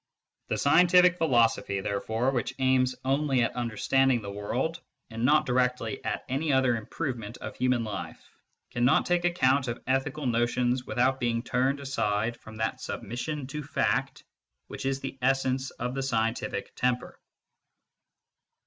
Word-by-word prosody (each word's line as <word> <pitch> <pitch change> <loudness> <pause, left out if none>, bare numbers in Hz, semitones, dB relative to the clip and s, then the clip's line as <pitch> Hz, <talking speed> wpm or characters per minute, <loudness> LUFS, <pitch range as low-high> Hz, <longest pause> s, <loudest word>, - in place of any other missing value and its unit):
The - - -1
scientific 180 +4 +5
philosophy, 115 -9 +2
therefore, 110 +6 -1
which 130 0 -2
aims 130 -1 +2
only 135 -2 +2
at 115 - -2
understanding 120 +1 +1
the 100 - -5
world 120 +11 -2 0.3
and 115 +1 -4
not 150 +3 +4
directly 125 +1 0
at - - -3
any 145 +4 -1
other 130 -2 +3
improvement 115 -1 -5
of - - -7
human 125 -2 +1
life, 110 -2 -6 0.5
cannot 120 +2 +3
take 175 0 +1
account 140 -6 +2
of 120 - -3
ethical 135 +3 -1
notions 120 +1 +1
without 130 +2 +1
being 115 -1 0
turned 130 +3 0
aside 115 -4 -1
from 110 -1 -13
that 110 0 -2
submission 135 +6 -4
to 150 +3 -5
fact 135 -2 -1 0.4
which - - -5
is 135 0 -1
the 135 0 -6
essence 130 0 +1
of 125 +1 -5
the 135 - -2
scientific 115 -5 -2
temper. 125 0 -1
130 Hz, 140 wpm, -28 LUFS, 120-135 Hz, 0.5 s, scientific